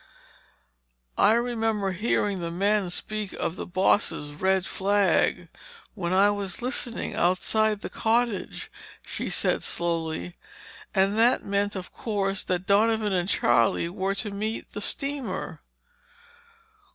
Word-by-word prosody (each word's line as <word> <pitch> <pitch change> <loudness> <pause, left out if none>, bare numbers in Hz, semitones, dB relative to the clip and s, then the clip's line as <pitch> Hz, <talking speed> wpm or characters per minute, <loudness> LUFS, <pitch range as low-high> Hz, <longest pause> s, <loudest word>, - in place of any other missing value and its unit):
"I 215 - +6
remember 225 -4 0
hearing 200 0 0
the 170 -1 -3
men 200 +2 +1
speak 210 +3 -3
of 165 - -3
the - - -6
bosses' 180 -5 +1
red 190 +4 +1
flag 190 -3 +1 0.5
when 180 -5 -3
I 195 +2 +5
was 200 -3 -3
listening 245 -2 -2
outside 205 +4 +1
the - - -4
cottage," 230 -2 -1 0.3
she - - -4
said - - +1
slowly, 170 0 -2 0.6
"and 195 +3 +2
that 240 +2 +4
meant, 200 +1 0
of 185 -1 -7
course, 195 -3 -1
that 180 0 -1
Donovan 215 +1 +3
and 180 0 0
Charlie 115 - +2
were 190 +2 -2
to 200 +1 -2
meet 215 +3 -4
the 205 - -5
steamer." 275 +3 -2
200 Hz, 125 wpm, -26 LUFS, 185-215 Hz, 0.6 s, I